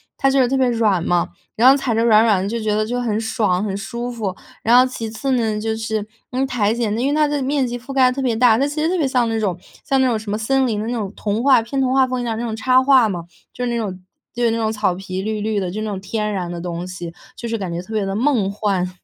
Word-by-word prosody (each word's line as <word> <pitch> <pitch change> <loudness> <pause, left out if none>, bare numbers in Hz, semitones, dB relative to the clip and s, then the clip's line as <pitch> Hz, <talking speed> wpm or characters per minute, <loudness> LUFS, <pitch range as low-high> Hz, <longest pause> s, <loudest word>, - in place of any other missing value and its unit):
它 270 - +2
就 270 0 +2
是 255 - +4
特 270 - 0
别 260 -1 +3
软 215 -7 +1
嘛， 175 0 +1 0.3
然 235 +3 +5
后， 270 - +8
踩 265 -5 -1
着 225 - +2
软 220 -1 +6
软 205 -5 +3
的 - - -2
就 230 +3 -2
觉 215 -1 0
得， 215 0 +1
就 245 +3 -2
很 220 -3 -1
爽、 215 -4 0
很 200 -2 -2
舒 235 +5 -5
服。 210 -6 -4 0.3
然 235 +2 +5
后 255 - +7
其 245 -3 -5
次 265 +5 -3
呢， 225 -4 +1
就 220 +1 -2
是， 220 -1 -3 0.2
嗯， 260 +2 0
苔 235 -6 0
藓 230 -3 -1
呢 230 - -2
因 260 - +1
为 290 - 0
它 305 0 +4
的 290 -1 -1
面 270 0 +1
积 245 0 -4
覆 250 +3 -10
盖 260 -2 +4
得 - - -6
特 275 - -2
别 245 -4 0
大， 230 -1 +4
它 280 - +2
其 295 +1 -4
实 315 - +1
特 365 - 0
别 285 - +2
像 250 -3 +1
那 225 0 -1
种 195 -5 -1 0.3
像 270 -1 +1
那 260 - +3
种 230 -3 0
什 215 -1 -8
么 210 - -1
森 265 +4 +1
林 215 -3 -1
的 215 - -3
那 240 - -2
种 210 -5 -3
童 215 +3 -2
话， 265 -5 +5
偏 270 +4 -2
童 255 - +1
话 265 -1 +5
风 255 -1 -3
一 - - -3
样 225 -2 -2
的 - - -3
那 - - -2
种 220 - -3
插 255 +3 +3
画 260 -4 +5
嘛， 175 -4 -4 0.3
就 250 - -3
是 - - -1
那 235 - -1
种 195 -5 -4 0.3
就 240 - -2
是 230 - +3
那 225 - -1
种 220 -1 0
草 210 -4 0
皮 190 0 -5
绿 215 +1 -3
绿 215 0 0
的， 185 -2 -2
就 215 +3 -4
那 215 - -3
种 195 -2 -4
天 210 +2 -3
然 180 -3 -3
的 175 - -5
东 175 0 -4
西， 175 -2 -7 0.2
就 235 - -6
是 230 - -1
感 190 -4 -4
觉 170 - -3
特 185 - -13
别 210 -2 0
地 195 - -3
梦 230 -4 +1
幻。 200 -3 -1
225 Hz, 340 characters per minute, -20 LUFS, 205-255 Hz, 0.3 s, 后